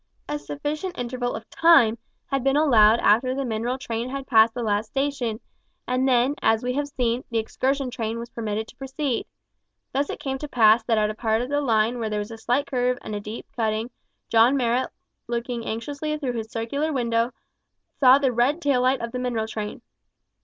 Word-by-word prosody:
A 295 - -3
sufficient 300 +6 -4
interval 245 0 -3
of 220 0 -8
time 240 -10 +5 0.3
had 275 -2 -2
been 270 +1 +2
allowed 230 -7 +5
after 255 +5 +3
the 275 0 -2
mineral 235 +2 -2
train 240 -3 -4
had 275 0 -5
passed 225 -3 +4
the 245 - -3
last 210 0 0
station, 270 -5 -2 0.5
and 255 +1 +1
then, 255 +1 +3
as 220 +1 +2
we 250 0 -1
have 290 +2 -1
seen, 250 -3 -1
the 230 - -1
excursion 260 +4 -1
train 225 -2 -3
was 235 +1 -7
permitted 220 -1 -3
to - - -15
proceed. 270 -1 -3 0.7
Thus 280 +2 0
it - - -5
came 270 -1 -3
to 300 - -5
pass 225 -3 +5
that 230 -2 +2
at 210 0 +2
a - - -6
part 220 +1 0
of 250 - -6
the 290 0 +1
line 230 -2 +1
where 225 -2 -2
there 210 - -2
was 210 +2 -4
a 225 - -8
slight 250 +6 0
curve 250 -2 0
and 215 - -6
a 205 - -2
deep 210 +2 -7
cutting, 220 +1 -1 0.4
John 235 +4 +4
Marrot 245 0 +1 0.4
looking 235 0 -3
anxiously 285 +7 -3
through 270 -5 -3
his 225 -2 -4
circular 280 +8 -2
window, 235 -3 0 0.7
saw 260 -1 +7
the 270 -3 +1
red 250 +7 +2
tail 280 -6 +2
light 255 +1 +2
of 235 0 -4
the 250 - -4
mineral 240 -3 -1
train. 215 -1 -6
245 Hz, 205 wpm, -24 LUFS, 225-270 Hz, 0.7 s, saw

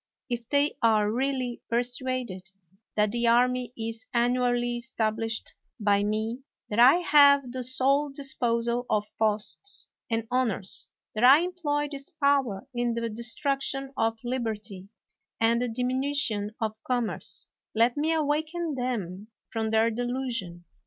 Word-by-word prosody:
If 235 -1 -3
they 285 +1 +2
are 215 -2 +3
really 255 0 -1
persuaded 245 -5 -1 0.5
that 210 -1 +2
the 235 +1 0
army 250 +1 +3
is 225 +1 -5
annually 245 0 +1
established 225 -2 -3 0.3
by 205 -1 +3
me, 220 +3 -1 0.3
that 210 - 0
I 250 +5 +8
have 285 -6 +5
the 255 0 -4
sole 270 +3 +2
disposal 245 -3 -1
of 210 0 -1
posts 215 - 0 0.2
and 225 -1 -1
honors, 230 -7 -1 0.3
that 215 - -2
I 270 +5 +8
employ 315 -5 -1
this 275 -1 -6
power 275 -7 +1
in 240 -1 0
the 230 0 -2
destruction 270 +4 -1
of 225 0 0
liberty 220 -6 -4 0.5
and 230 +1 +3
the 245 - -1
dimi 250 +2 -1
nution 230 -8 -1
of 220 -1 -3
commerce, 245 -3 -3 0.3
let 235 +2 +3
me 305 +2 +1
awaken 315 +1 0
them 215 -7 -3 0.2
from 220 -1 -1
their 220 +1 +3
delusion. 235 -7 -3
240 Hz, 130 wpm, -27 LUFS, 220-265 Hz, 0.5 s, I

